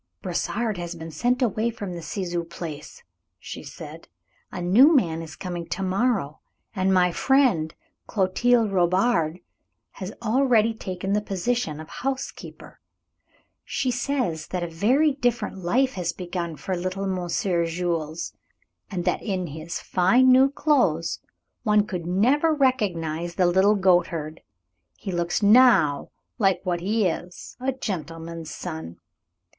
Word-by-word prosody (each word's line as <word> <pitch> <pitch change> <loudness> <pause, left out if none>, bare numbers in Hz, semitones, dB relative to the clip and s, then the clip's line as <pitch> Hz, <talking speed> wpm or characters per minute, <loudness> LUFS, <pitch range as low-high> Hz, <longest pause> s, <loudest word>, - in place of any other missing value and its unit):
"Brossard 205 +3 -2
has 175 0 -5
been 165 0 -8
sent 250 - +1
away 225 0 +1
from 205 -5 -6
the 170 - -6
Ciseaux 175 +1 -3
place," 165 -3 -8 0.3
she - - -8
said. - - -10 0.4
"A - - -6
new 235 - +6
man 165 - +2
is 160 -1 -9
coming 175 -2 -5
to 175 +3 -3
morrow, 190 - 0 0.4
and 190 0 +1
my 180 -1 +4
friend, 235 - +2 0.3
Clotilde 225 +3 +2
Robard, 180 -2 +2 0.5
has 190 0 -7
already 230 -1 +3
taken 190 -2 -4
the 210 - +2
position 195 -4 -2
of 155 - -8
housekeeper. 265 +6 -6 0.8
She 260 -2 -1
says 245 - -2
that 180 -1 -3
a - - -2
very 245 - +2
different 245 -7 -1
life 255 +9 +1
has 180 -2 -2
begun 175 -2 -4
for 185 +4 -3
little 185 +2 -3
Monsieur 180 -1 0
Jules, 165 -2 -3 0.6
and 180 -4 -4
that - - +1
in 190 -4 -2
his 160 +2 -6
fine 240 +9 +4
new 260 +2 +6
clothes 250 - +1 0.4
one 210 -2 +3
could 180 -5 -5
never 265 - +3
recognize 175 - 0
the 185 - +3
little 190 +4 +4
goatherd. 170 -5 +1 0.6
He 195 - -5
looks 175 +3 -1
now 205 - +5 0.3
like 195 -4 +3
what 180 -2 -1
he 210 +4 +1
is, 175 +1 -4
a 260 +2 0
gentleman's 165 - -5
son. 160 - -7
185 Hz, 135 wpm, -24 LUFS, 170-235 Hz, 0.8 s, new